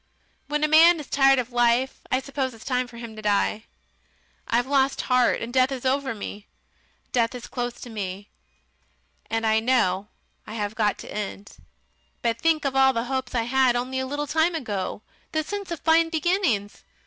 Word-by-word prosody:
When 295 +1 -1
a - - +4
man 325 +2 +7
is 300 - -7
tired 270 -1 +4
of 250 -1 -2
life, 240 +2 +2
I 255 - +3
suppose 270 -1 -3
it - - -13
is 220 - -13
time 250 -1 0
for 235 -1 -13
him 230 -2 -8
to 215 - -8
die. 210 +1 0 0.8
I've 240 +1 +1
lost 270 0 +1
heart, 250 -1 +2
and 235 +1 -6
death 260 0 +3
is 265 -1 -5
over 265 -1 0
me. 205 0 -8 0.6
Death 235 -1 +1
is 245 - -7
close 245 -1 -3
to 245 - -8
me, 200 -1 -5 1.0
and 225 0 -1
I 220 0 +3
know 220 -5 +1 0.4
I 220 - -7
have 205 -1 -2
got 215 -2 +1
to - - -9
end. 205 -1 -6 0.7
But 230 -1 0
think 320 -2 +2
of 270 -1 -1
all 265 0 +5
the 230 -1 -1
hopes 260 -2 -3
I 230 - +2
had 255 +1 +3
only 255 +2 -2
a 260 - -2
little 290 +2 -3
time 320 +3 +1
ago, 205 - -4 0.3
the 315 0 +1
sense 405 +4 -5
of 335 -4 -5
fine 325 +1 +4
beginnings!... 320 - 0
255 Hz, 195 wpm, -25 LUFS, 225-280 Hz, 1.0 s, man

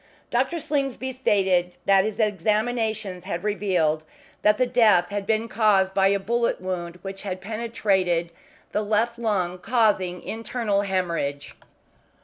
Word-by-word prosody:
Dr. 260 +8 +1
Slingsby 275 -4 -2
stated 190 -8 +1
that 195 0 +5
his 215 -1 -3
examinations 215 -1 -1
had 170 +2 -4
revealed 180 -7 0 0.4
that 240 +4 +2
death 215 -7 +5
had 205 -1 -4
been 220 +1 +1
caused 200 -3 +2
by 195 0 +4
a 200 +1 +3
bullet 235 +4 0
wound 180 -2 -4
which 195 0 -6
had 185 -2 -4
penetrated 195 -5 0 0.4
the 210 - 0
left 220 +3 0
lung, 185 -6 -1
causing 195 -4 +1
internal 225 -2 -1
hemorrhage. 170 -7 -2
205 Hz, 125 wpm, -24 LUFS, 185-225 Hz, 0.4 s, that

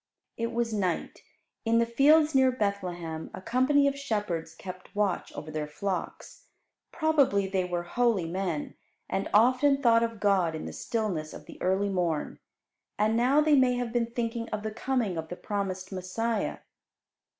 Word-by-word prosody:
It 230 0 -2
was 235 -1 -1
night. 185 -5 -2 0.4
In 230 0 +2
the 235 - +4
fields 300 +6 +4
near 265 -1 +5
Bethlehem 180 -8 -3
a - - -7
company 260 +7 +3
of 280 - 0
shepherds 210 -12 -3
kept 185 +1 -10
watch 205 -3 0
over 155 - -7
their 155 -1 -3
flocks. 195 - -5 0.5
Probably 290 - +2
they 190 -1 0
were 175 -1 -2
holy 220 0 +1
men, 170 -3 -3 0.3
and 195 - -2
often 255 +6 +4
thought 230 -4 +4
of 230 -2 -2
God 190 -6 +2
in 155 - -5
the - - -6
stillness 200 -10 -3
of - - -11
the - - -13
early 190 +2 +1
morn. 175 -5 -1 0.6
And 215 +2 +2
now 255 +6 +4
they 305 -1 +4
may 255 -2 +4
have 245 -2 -3
been 235 -1 +1
thinking 230 -1 -3
of 215 0 -4
the 215 - -3
coming 230 -6 -1
of 160 0 -6
the 180 - -5
promised 190 -1 -4
Messiah. 200 +4 -2
215 Hz, 165 wpm, -28 LUFS, 185-245 Hz, 0.6 s, near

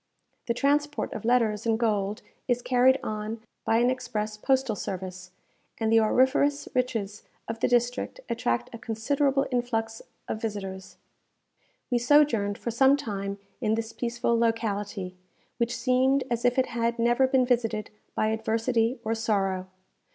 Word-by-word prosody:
The 235 - 0
transport 290 +3 0
of 220 - -6
letters 230 -3 +2
and 225 -1 +3
gold 210 -2 0 0.2
is 245 -1 0
carried 260 +1 +4
on 215 +1 -4 0.3
by 225 - +3
an 245 +2 +3
express 220 -4 -3
postal 260 +1 +1
service; 185 -1 -6 0.5
and 225 -1 0
the 225 - +6
auriferous 265 +6 +2
riches 225 -5 -1 0.3
of 225 0 -4
the - - +2
district 245 - 0
attract 120 - -1
a 230 - -7
considerable 270 +4 0
influx 225 -2 -1 0.3
of 220 - -4
visitors. 195 -4 -5 0.9
We 245 - +3
sojourned 240 -6 +3
for 235 - -4
some 265 +4 +5
time 200 -6 -4 0.2
in 220 -2 +2
this 225 0 -4
peaceful 235 0 -1
locality, 205 -5 -1 0.4
which 235 0 -1
seemed 260 +1 +2
as 235 0 -1
if 245 +1 +3
it 260 - +2
had 235 0 0
never 240 +3 +3
been 260 -1 +3
visited 230 -4 0 0.2
by 215 - +1
adversity 225 +2 0
or 225 - 0
sorrow. 195 -5 0
230 Hz, 145 wpm, -27 LUFS, 215-250 Hz, 0.9 s, the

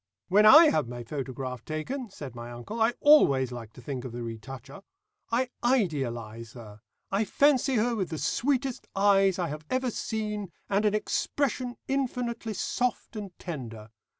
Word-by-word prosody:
"When 210 +3 +6
I 310 +6 +9
have 155 -6 +1
my 120 0 -6
photograph 130 -1 -5
taken," 225 - -4
said 145 -9 -8
my 120 0 -8
uncle, 120 - -6
"I 225 +2 +3
always 140 - +6
like 115 -3 -8
to 125 - -13
think 130 -1 -4
of 130 - -6
the 120 0 -5
retoucher. 115 - -8 0.5
I 250 +2 +1
idealise 120 - -1
her; 110 -4 -12 0.3
I 200 +3 +2
fancy 270 +2 +3
her 235 +1 +2
with 190 -5 -2
the 160 - -4
sweetest 265 - -1
eyes 195 -1 +4
I 175 -3 -1
have 150 +1 -6
ever 255 -1 0
seen, 210 -4 -3 0.2
and 200 +2 +1
an 210 0 +3
expression 250 +2 -1
infinitely 245 -4 -2
soft 245 +3 -2
and 200 -4 -7
tender. 115 - -7
195 Hz, 160 wpm, -28 LUFS, -, 0.5 s, I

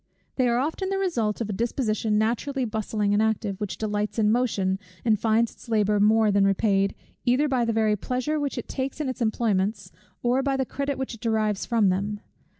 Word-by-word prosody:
They 255 -2 +2
are 235 0 +2
often 320 +8 -1
the 390 - 0
result 240 - -1
of 220 - -2
a - - -3
disposition 220 -1 0
naturally 245 +5 0
bustling 215 -2 -1
and 205 - +3
active, 215 -2 -1
which 205 -3 -3
delights 210 0 -2
in 215 -1 +3
motion, 200 -6 +1 0.3
and 215 -3 +3
finds 225 +1 +2
its - - -16
labour 210 -2 +2
more 215 +1 +4
than 200 0 +3
repaid, 195 0 +2 0.3
either 260 +4 +3
by 255 -4 +1
the 230 - +1
very 220 -1 +2
pleasure 255 +8 -2
which 285 -2 -2
it - - -5
takes 265 +2 -4
in 300 - -1
its 255 - -5
employments, 205 -3 0 0.3
or 250 +2 +2
by 270 0 0
the 265 - 0
credit 280 +2 -3
which 265 -1 -4
it 230 - -11
derives 215 -3 0
from 225 -4 +3
them. 205 +3 -2
220 Hz, 205 wpm, -25 LUFS, 210-255 Hz, 0.3 s, more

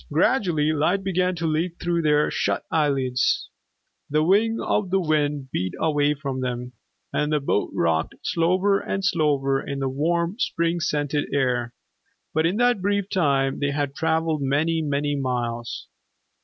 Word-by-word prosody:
Gradually 160 - +2
light 175 +6 +1
began 185 -1 0
to 165 -1 -3
leak 165 +2 -1
through 175 -1 0
their 150 -1 +2
shut - - -1
eyelids, 135 -5 +1 0.6
the 155 +1 +2
wing 220 +6 +3
of 205 -3 0
the 190 +1 +2
wind 145 -5 0
beat 90 0 -2
away 150 -2 +2
from 135 -3 -4
them, 125 0 -4 0.4
and 150 0 0
the 150 - +2
boat 135 -7 0
rocked 80 -1 0
slower 185 +4 +2
and 195 0 -3
slower 145 -6 +1
in 140 -1 -3
warm, 170 - 0
spring 170 -6 0
scented 145 -2 -1
air. 125 -3 0 0.6
But 160 +2 +2
in 185 +5 -1
that 245 -4 +3
brief 200 0 0
time, 140 -6 +1
they 145 - 0
had 140 -1 -2
traveled 160 0 0
many, 155 +4 +1
many 145 -1 -1
miles. 120 -3 -3
150 Hz, 150 wpm, -24 LUFS, 140-175 Hz, 0.6 s, wing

